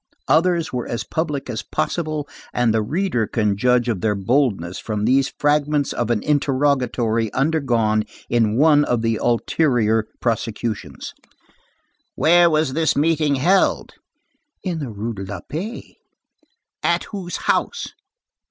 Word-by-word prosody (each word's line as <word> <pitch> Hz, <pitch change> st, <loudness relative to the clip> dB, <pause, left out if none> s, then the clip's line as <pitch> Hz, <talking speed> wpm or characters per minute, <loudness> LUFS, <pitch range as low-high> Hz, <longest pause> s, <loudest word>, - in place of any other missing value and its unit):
Others 170 Hz, -1 st, +2 dB
were 125 Hz, -1 st, -3 dB
as 120 Hz, -, -3 dB
public 150 Hz, -4 st, -3 dB
as 115 Hz, -3 st, -3 dB
possible, 155 Hz, -3 st, -2 dB, 0.3 s
and 120 Hz, -2 st, +2 dB
the 110 Hz, -, +2 dB
reader 140 Hz, -, -1 dB
can 105 Hz, -3 st, 0 dB
judge 125 Hz, +3 st, +2 dB
of 110 Hz, -7 st, -1 dB
their 105 Hz, -2 st, +1 dB
boldness 100 Hz, -, 0 dB
from 105 Hz, -1 st, -3 dB
these 135 Hz, +3 st, +2 dB
fragments 145 Hz, -1 st, +1 dB
of 120 Hz, -1 st, -2 dB
an 115 Hz, -3 st, 0 dB
interrogatory 130 Hz, -6 st, +1 dB
undergone 120 Hz, -7 st, +1 dB, 0.2 s
in 115 Hz, -2 st, +1 dB
one 150 Hz, 0 st, +5 dB
of 120 Hz, -4 st, 0 dB
the 115 Hz, -1 st, +1 dB
ulterior 115 Hz, -3 st, +1 dB
prosecutions: 110 Hz, -, -3 dB, 1.0 s
"Where 170 Hz, +1 st, +5 dB
was 155 Hz, -4 st, +1 dB
this 160 Hz, +1 st, +1 dB
meeting 155 Hz, -1 st, +2 dB
held?" 180 Hz, +9 st, +2 dB, 0.7 s
"In 175 Hz, -4 st, -2 dB
the 140 Hz, -5 st, -4 dB
Rue 110 Hz, +2 st, -4 dB
de 100 Hz, -2 st, -6 dB
la 95 Hz, +1 st, -6 dB
Paix." 195 Hz, +10 st, -6 dB, 0.9 s
"At -, -, +1 dB
whose 190 Hz, -4 st, -6 dB
house?" 475 Hz, -, 0 dB
125 Hz, 135 wpm, -21 LUFS, 110-155 Hz, 1.0 s, one